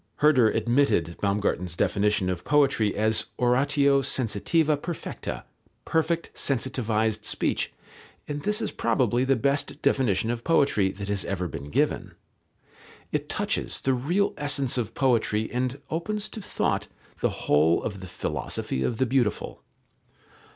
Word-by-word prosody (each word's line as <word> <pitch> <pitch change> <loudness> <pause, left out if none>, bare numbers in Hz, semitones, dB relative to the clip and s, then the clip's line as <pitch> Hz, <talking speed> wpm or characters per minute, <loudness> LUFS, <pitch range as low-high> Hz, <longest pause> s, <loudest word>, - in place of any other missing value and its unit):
Herder 135 -7 +5
admitted 115 - +1
Baumgarten's 100 -4 0
definition 105 +1 +1
of 90 -1 -4
poetry 135 -7 +2
as 110 +1 +2
oratio 140 +3 +3
sensitiva 140 - +1
perfecta, 170 -2 -5 0.4
perfect 165 +1 0
sensitived 110 -5 0
speech, - - -1 0.6
and 145 0 -4
this 210 +4 0
is - - -2
probably 120 +1 +1
the 135 0 +3
best 140 +4 0
definition 110 -4 +2
of 120 0 -4
poetry 140 -12 +3
that 100 +1 -6
has 100 -2 0
ever 90 -2 -2
been 70 -2 -7
given. - - 0 1.0
It - - -2
touches - - -1
the 135 - +1
real 170 +11 +1
essence 140 -3 +1
of 115 -3 -2
poetry 110 -4 +1
and 125 +2 -2
opens 210 +6 -2
to 220 - -7
thought - - -1 0.3
the - - +2 0.2
whole 80 +3 +3
of 100 -3 -4
the 95 - -8
philosophy 65 -5 -3
of 115 - -1
the 130 - +2
beautiful. 125 -4 -1
120 Hz, 135 wpm, -26 LUFS, 105-140 Hz, 1.0 s, Herder